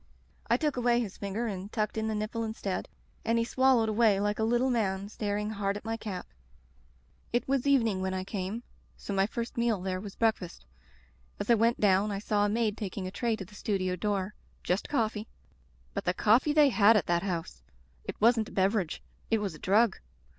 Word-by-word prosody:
I 235 Hz, -, +4 dB
took 295 Hz, -1 st, -1 dB
away 240 Hz, -1 st, +3 dB
his 215 Hz, -6 st, -3 dB
finger 200 Hz, +4 st, -3 dB
and 200 Hz, -2 st, -5 dB
tucked 215 Hz, -2 st, -1 dB
in 220 Hz, 0 st, -1 dB
the 220 Hz, -, -1 dB
nipple 215 Hz, +2 st, -2 dB
instead, 220 Hz, -4 st, -3 dB, 0.3 s
and 230 Hz, +1 st, +1 dB
he 230 Hz, -, +2 dB
swallowed 260 Hz, -2 st, +3 dB
away 215 Hz, -2 st, +3 dB
like 205 Hz, +1 st, 0 dB
a -, -, +1 dB
little 240 Hz, +3 st, +2 dB
man, 200 Hz, -4 st, -1 dB
staring 210 Hz, 0 st, -2 dB
hard 200 Hz, -1 st, -1 dB
at 205 Hz, -, -11 dB
my 225 Hz, 0 st, -1 dB
cap. 205 Hz, -5 st, -5 dB, 1.1 s
"It 240 Hz, -, 0 dB
was 270 Hz, 0 st, +1 dB
evening 230 Hz, -9 st, +3 dB
when 190 Hz, 0 st, -1 dB
I 185 Hz, -, -2 dB
came, 195 Hz, +4 st, -4 dB, 0.3 s
so 200 Hz, -, -5 dB
my 195 Hz, 0 st, +2 dB
first 235 Hz, +1 st, -5 dB
meal 235 Hz, -4 st, +1 dB
there 185 Hz, 0 st, -2 dB
was 205 Hz, -1 st, -8 dB
breakfast. 210 Hz, -, -1 dB, 0.7 s
As 220 Hz, -, 0 dB
I -, -, +8 dB
went 230 Hz, +1 st, +2 dB
down 200 Hz, 0 st, +3 dB
I 200 Hz, -, -2 dB
saw 205 Hz, 0 st, +1 dB
a -, -, +1 dB
maid 220 Hz, 0 st, 0 dB
taking 195 Hz, -2 st, -4 dB
a 185 Hz, -, -4 dB
tray 230 Hz, +2 st, 0 dB
to 195 Hz, -, -7 dB
the 200 Hz, -, -18 dB
studio 190 Hz, -3 st, -1 dB
door 200 Hz, +1 st, -1 dB, 0.2 s
— -, -, -35 dB
^just 180 Hz, +4 st, 0 dB
coffee. 220 Hz, -5 st, -1 dB, 0.7 s
But -, -, -3 dB
the 180 Hz, -, +1 dB
coffee 235 Hz, +10 st, +4 dB
they 295 Hz, -1 st, +6 dB
had 225 Hz, -2 st, +6 dB
at 190 Hz, -, 0 dB
that 170 Hz, 0 st, +1 dB
house! 170 Hz, -, -4 dB, 0.4 s
It -, -, -7 dB
wasn't 225 Hz, 0 st, +3 dB
a -, -, -14 dB
beverage; 190 Hz, -3 st, 0 dB, 0.3 s
it 225 Hz, -, +3 dB
was 205 Hz, -5 st, -3 dB
a 155 Hz, -, -12 dB
drug. 210 Hz, +3 st, +3 dB
210 Hz, 210 wpm, -29 LUFS, 195-230 Hz, 1.1 s, I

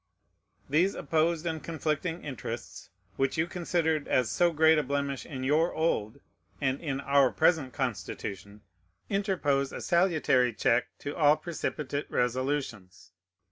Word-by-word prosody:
These 170 Hz, +8 st, +2 dB
opposed 165 Hz, +1 st, 0 dB
and 160 Hz, -2 st, -3 dB
conflicting 165 Hz, +1 st, -2 dB
interests, 135 Hz, -5 st, -7 dB, 0.3 s
which 135 Hz, +2 st, 0 dB
you 160 Hz, -, +2 dB
considered 165 Hz, -3 st, -1 dB
as 120 Hz, -5 st, +1 dB
so 175 Hz, -, +3 dB
great 160 Hz, 0 st, +5 dB
a -, -, +2 dB
blemish 140 Hz, -1 st, -3 dB
in 130 Hz, -3 st, -6 dB
your 155 Hz, +5 st, +2 dB
old 140 Hz, -7 st, -1 dB, 0.4 s
and 135 Hz, -1 st, -1 dB
in 140 Hz, -5 st, -2 dB
our 140 Hz, -2 st, +4 dB
present 145 Hz, -4 st, +2 dB
Constitution, 105 Hz, -5 st, -5 dB, 0.5 s
interpose 175 Hz, -9 st, 0 dB
a -, -, -6 dB
salutary 155 Hz, -9 st, +2 dB
check 115 Hz, +3 st, +2 dB
to 145 Hz, -, -5 dB
all 150 Hz, -2 st, +5 dB
precipitate 150 Hz, -3 st, -4 dB
resolutions. 125 Hz, -6 st, -2 dB
145 Hz, 130 wpm, -29 LUFS, 130-160 Hz, 0.5 s, great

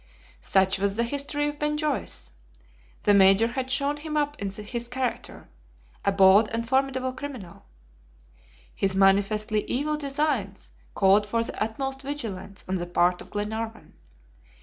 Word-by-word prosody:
Such 190 Hz, -, +2 dB
was 200 Hz, 0 st, 0 dB
the 235 Hz, -, +1 dB
history 285 Hz, +4 st, 0 dB
of 295 Hz, 0 st, -5 dB
Ben 300 Hz, 0 st, 0 dB
Joyce. 300 Hz, -, -2 dB, 0.7 s
The 205 Hz, -, +4 dB
Major 195 Hz, +2 st, +6 dB
had 255 Hz, +2 st, -3 dB
shown 280 Hz, +3 st, 0 dB
him 305 Hz, 0 st, -4 dB
up 290 Hz, 0 st, 0 dB
in 200 Hz, -, -2 dB
his 215 Hz, +4 st, -5 dB
character 255 Hz, 0 st, -4 dB, 0.6 s
a 200 Hz, -, +2 dB
bold 195 Hz, +2 st, +6 dB
and 230 Hz, +1 st, -3 dB
formidable 260 Hz, 0 st, 0 dB
criminal. 255 Hz, -9 st, -8 dB, 1.1 s
His 195 Hz, -1 st, 0 dB
manifestly 205 Hz, +2 st, +2 dB
evil 300 Hz, +4 st, -1 dB
designs 275 Hz, -9 st, -2 dB, 0.2 s
called 200 Hz, +1 st, +4 dB
for 230 Hz, +2 st, 0 dB
the -, -, -5 dB
utmost 270 Hz, +5 st, -4 dB
vigilance 225 Hz, -9 st, -6 dB
on 190 Hz, +1 st, -1 dB
the 175 Hz, -, -4 dB
part 175 Hz, 0 st, +2 dB
of -, -, -12 dB
Glenarvan. 220 Hz, +2 st, -5 dB
230 Hz, 145 wpm, -26 LUFS, 200-275 Hz, 1.1 s, Major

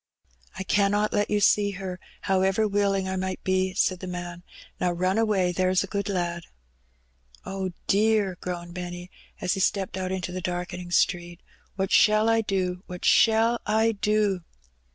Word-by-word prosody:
"I 190 Hz, -, -3 dB
cannot 205 Hz, +2 st, +1 dB
let 205 Hz, 0 st, +1 dB
you 210 Hz, -, +2 dB
see 205 Hz, 0 st, +3 dB
her, 185 Hz, -2 st, -5 dB, 0.2 s
however 195 Hz, +3 st, +2 dB
willing 200 Hz, -2 st, +1 dB
I 190 Hz, -, -2 dB
might 185 Hz, 0 st, -3 dB
be," 185 Hz, 0 st, 0 dB
said 185 Hz, -1 st, +1 dB
the 185 Hz, -, -7 dB
man. 175 Hz, -1 st, -6 dB, 0.4 s
*^Now 175 Hz, -1 st, 0 dB
run 185 Hz, +4 st, +1 dB
away, 200 Hz, -5 st, +2 dB
there's 185 Hz, +1 st, +1 dB
a -, -, -6 dB
good 200 Hz, 0 st, -1 dB
lad." 175 Hz, -3 st, -2 dB, 1.0 s
"Oh, 190 Hz, -1 st, -3 dB, 0.2 s
dear," 210 Hz, -2 st, +2 dB
groaned 175 Hz, -1 st, -5 dB
Benny, 180 Hz, 0 st, -7 dB, 0.3 s
as 180 Hz, -, +1 dB
he -, -, -3 dB
stepped 190 Hz, 0 st, 0 dB
out 185 Hz, 0 st, -3 dB
into 185 Hz, -1 st, -3 dB
the 185 Hz, +1 st, -4 dB
darkening 180 Hz, 0 st, -4 dB
street. 175 Hz, -1 st, 0 dB, 0.4 s
"What 190 Hz, 0 st, -2 dB
shall 215 Hz, +1 st, +5 dB
I 225 Hz, 0 st, +3 dB
do? 185 Hz, -3 st, -2 dB
what 180 Hz, -1 st, -7 dB
shall 230 Hz, +1 st, +4 dB
I 220 Hz, +2 st, +3 dB
do?" 210 Hz, -2 st, +1 dB
190 Hz, 165 wpm, -26 LUFS, 180-205 Hz, 1.0 s, shall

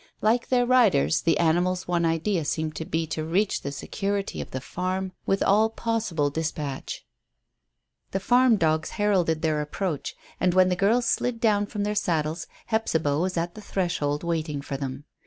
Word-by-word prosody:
Like 230 Hz, +3 st, +2 dB
their 245 Hz, -1 st, +3 dB
riders, 230 Hz, -, +4 dB
the 165 Hz, -, +2 dB
animals' 175 Hz, +3 st, +1 dB
one 175 Hz, -1 st, +1 dB
idea 165 Hz, +2 st, 0 dB
seemed 155 Hz, +1 st, -2 dB
to 160 Hz, -, -4 dB
be 160 Hz, +1 st, -1 dB
to 155 Hz, 0 st, -3 dB
reach 185 Hz, +6 st, 0 dB
the 140 Hz, -, -4 dB
security 200 Hz, +7 st, -3 dB
of -, -, -8 dB
the 130 Hz, -, -4 dB
farm 185 Hz, +6 st, -3 dB, 0.2 s
with 195 Hz, -, +2 dB
all 215 Hz, +3 st, +4 dB
possible 220 Hz, -11 st, -1 dB
dispatch. 150 Hz, -3 st, -4 dB, 1.0 s
The 195 Hz, -, -2 dB
farm 245 Hz, +3 st, +4 dB
dogs 160 Hz, -4 st, +1 dB
heralded 180 Hz, -6 st, +1 dB
their 155 Hz, -2 st, +1 dB
approach, 150 Hz, +1 st, -3 dB, 0.2 s
and 185 Hz, -1 st, +2 dB
when 185 Hz, 0 st, +5 dB
the 180 Hz, -, +1 dB
girls 220 Hz, +6 st, +2 dB
slid 245 Hz, -2 st, 0 dB
down 205 Hz, -3 st, +2 dB
from 205 Hz, -1 st, -3 dB
their 210 Hz, +1 st, 0 dB
saddles 165 Hz, -5 st, -1 dB, 0.2 s
Hephzibah 160 Hz, -10 st, 0 dB
was 180 Hz, +1 st, -1 dB
at 170 Hz, +1 st, -1 dB
the 215 Hz, -, -10 dB
threshold 175 Hz, -7 st, -1 dB
waiting 160 Hz, -3 st, -2 dB
for 140 Hz, -, -4 dB
them. 135 Hz, +1 st, -5 dB
175 Hz, 175 wpm, -26 LUFS, 155-205 Hz, 1.0 s, when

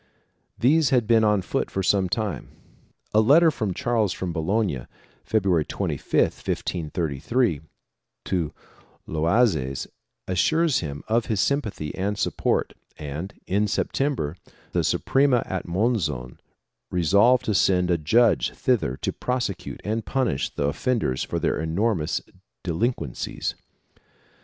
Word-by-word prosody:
These 150 Hz, +4 st, +4 dB
had 125 Hz, -4 st, +3 dB
been 115 Hz, 0 st, +4 dB
on 105 Hz, -3 st, +3 dB
foot -, -, -2 dB
for 95 Hz, -, -2 dB
some 95 Hz, -1 st, +2 dB
time. 100 Hz, -, -2 dB, 0.6 s
A 110 Hz, -, +6 dB
letter 155 Hz, +9 st, +6 dB
of 105 Hz, -, -2 dB
Charles 115 Hz, -5 st, +1 dB
from 90 Hz, -2 st, -4 dB
Bologna, 85 Hz, -, -1 dB, 0.4 s
February 95 Hz, -7 st, +2 dB
25, -, -, -4 dB, 0.2 s
1533, 85 Hz, -, -1 dB, 0.6 s
to 85 Hz, -5 st, -1 dB, 0.6 s
Loazes 80 Hz, -, +1 dB, 0.4 s
assures 155 Hz, -, +2 dB
him 70 Hz, -3 st, -5 dB
of 115 Hz, +1 st, +1 dB
his 110 Hz, -5 st, 0 dB
sympathy 110 Hz, -, -1 dB
and 100 Hz, +2 st, -2 dB
support -, -, 0 dB, 0.2 s
and, 75 Hz, +6 st, -6 dB
in 105 Hz, +3 st, +1 dB
September, 120 Hz, -, -1 dB, 0.4 s
the -, -, +1 dB
Suprema 135 Hz, -3 st, +2 dB
at 95 Hz, -1 st, -4 dB
Monzon 85 Hz, -, -1 dB, 0.5 s
resolved 100 Hz, +9 st, +4 dB
to 110 Hz, -, +1 dB
send 90 Hz, -1 st, +3 dB
a 85 Hz, -, +3 dB
judge 110 Hz, +9 st, +3 dB
thither 105 Hz, -, 0 dB
to -, -, -1 dB
prosecute 125 Hz, -7 st, -3 dB
and 110 Hz, +2 st, -2 dB
punish 130 Hz, -, 0 dB
the -, -, -4 dB
offenders 80 Hz, -, 0 dB
for -, -, -3 dB
their -, -, 0 dB
enormous 85 Hz, +1 st, 0 dB, 0.4 s
delin 110 Hz, +9 st, 0 dB
quencies. 70 Hz, -7 st, -4 dB
100 Hz, 125 wpm, -24 LUFS, 80-120 Hz, 0.6 s, A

